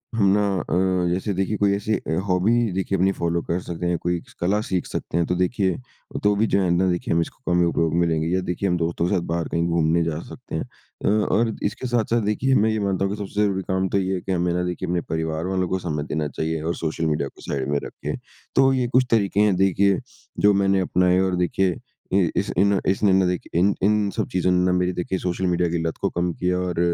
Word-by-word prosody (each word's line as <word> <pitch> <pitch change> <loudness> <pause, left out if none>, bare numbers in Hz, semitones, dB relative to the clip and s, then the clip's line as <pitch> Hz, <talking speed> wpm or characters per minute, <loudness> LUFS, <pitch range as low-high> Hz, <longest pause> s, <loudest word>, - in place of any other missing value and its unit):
हम 105 - +3
ना - - +2 0.2
अ, 90 -1 +1
जैसे 95 +2 -2
देखिए 95 +3 -1
कोई 100 -1 +2
ऐसी 105 +2 -1
अ, 80 - -3
हॉबी 105 +4 +2
देखिए 95 +1 -1
अपनी 95 +2 +3
फ़ॉलो 85 0 -1
कर 85 +2 -1
सकते 85 0 -5
हैं 85 - +1
कोई 85 0 -1
स - - -17
कला 100 +4 +2
सीख 90 -2 0
सकते 85 - -4
हैं। 85 - +2
तो 90 - 0
देखिए 95 0 +1 0.5
तो 105 0 +3
भी 110 +2 +2
जो 100 - +2
है 90 - +1
ना 90 +2 +2
देखिए 85 -1 -1
हम 85 - +3
इसको 90 - -5
कम 90 - +3
ही - - +4
उपयोग 80 -1 0
में 85 0 +3
लेंगे 80 0 0
या 95 - +1
देखिए 90 +2 -2
हम 90 - +1
दोस्तों 85 +1 -1
के 100 - +1
साथ 90 - +1
बाहर 85 -1 -1
कहीं 85 0 0
घूमने 85 0 +2
जा 80 -1 -2
सकते - - -8
हैं। - - -1 0.4
अ, - - +2
और 110 +2 +2
इसके 125 +5 -2
साथ-साथ 120 -1 +1
देखिए 130 +6 +1
मैं 110 +2 +3
ये 110 - -1
मानता 95 -1 0
हूँ 100 - -1
कि - - -11
सबसे 105 +2 -2
ज़रूरी 95 -2 0
काम 95 0 +1
तो - - +1
ये 95 0 -1
है 90 - -4
कि, 95 - -5
हमें 90 0 0
ना 90 0 0
देखिए 90 +1 -3
अपने 90 -1 0
परिवार 80 +1 -3
वालों 95 -1 0
को 95 - 0
समय 75 -4 -3
देना 75 -1 -1
चाहिए 80 +1 -3
और 85 +1 -1
सोशल 80 0 -2
मीडिया 75 -2 0
को - - -19
साइड 70 -2 -3
में 70 - +1
रखिए। - - -5 0.4
तो 135 0 +5
ये 125 -2 +1
कुछ 130 0 +5
तरीके 100 -3 +2
हैं 105 -3 +3
देखिए 95 0 +3 0.5
जो 105 - +7
मैंने 95 0 +3
अपनाए 90 0 +2
और 95 -1 +1
देखिए 90 +1 +1 0.4
इ 95 -4 +3
इस - - 0
इन 100 0 +3
इसने 95 +1 +3
ना 95 0 +4
देखिए 90 -1 -2
इन 100 +3 +4
इन 105 0 +3
सब - - 0
चीज़ों 90 0 +2
ने 90 0 +2
ना 90 - +3
मेरी 90 0 0
देखिए 90 +1 -2
सोशल 90 +1 -2
मीडिया 90 -1 +1
की 85 - 0
लत 80 - -4
को - - +1
कम 85 0 -1
किया 90 0 -1
और 90 -2 -2
90 Hz, 255 wpm, -23 LUFS, 85-100 Hz, 0.5 s, जो